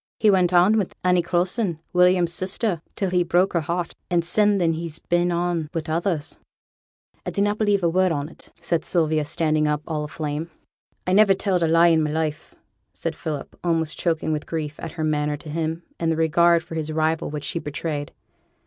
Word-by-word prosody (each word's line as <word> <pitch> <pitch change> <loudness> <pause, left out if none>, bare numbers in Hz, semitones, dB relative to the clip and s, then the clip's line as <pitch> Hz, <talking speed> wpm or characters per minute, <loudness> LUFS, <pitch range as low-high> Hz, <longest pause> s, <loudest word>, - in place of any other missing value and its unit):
He 215 -1 +5
went 185 -2 +3
on 185 +5 +5
wi' 195 - 0 0.2
Annie 180 -1 +3
Coulson, 175 +1 -1
William's 180 -1 +4
sister, 185 -1 -1
till 195 -3 -1
he 180 -1 +3
broke 175 +3 +2
her 170 - +1
heart; 170 +2 -3 0.2
and 170 -2 +1
sin 205 +2 +3
then 170 -3 +2
he's 160 -1 -5
been 175 +1 0
on 170 -2 -1
wi' 165 - -1
others.' 165 -1 -2 0.8
'I - - -3
dunnot 205 +1 0
believe 205 -3 +2
a - - +4
word 185 +2 +2
on 145 -2 -2
't,' - - -17
said 170 -1 -1
Sylvia, 155 -3 +1
standing 155 0 +1
up, 150 0 -1
all 155 -2 -2
aflame. 150 +1 -4 0.6
'I 185 - 0
niver 200 -1 +6
telled 185 -2 0
a 165 - +3
lie 165 +1 +5
i' 165 - +4
my 155 -1 +1
life,' 155 0 -3 0.4
said 165 -1 -3
Philip, 155 -3 -5
almost 165 -2 0
choking 160 -2 0
with 150 -1 -3
grief 155 -2 -4
at 160 - -6
her 160 - -4
manner 150 -1 0
to 155 +1 -11
him, 160 +2 -3 0.2
and 165 -1 +1
the - - +1
regard 170 +1 +3
for 165 - -10
his 155 -1 -3
rival 160 +1 0
which 150 -1 -5
she 170 - -2
betrayed. 150 -1 -4
165 Hz, 200 wpm, -23 LUFS, 155-180 Hz, 0.8 s, niver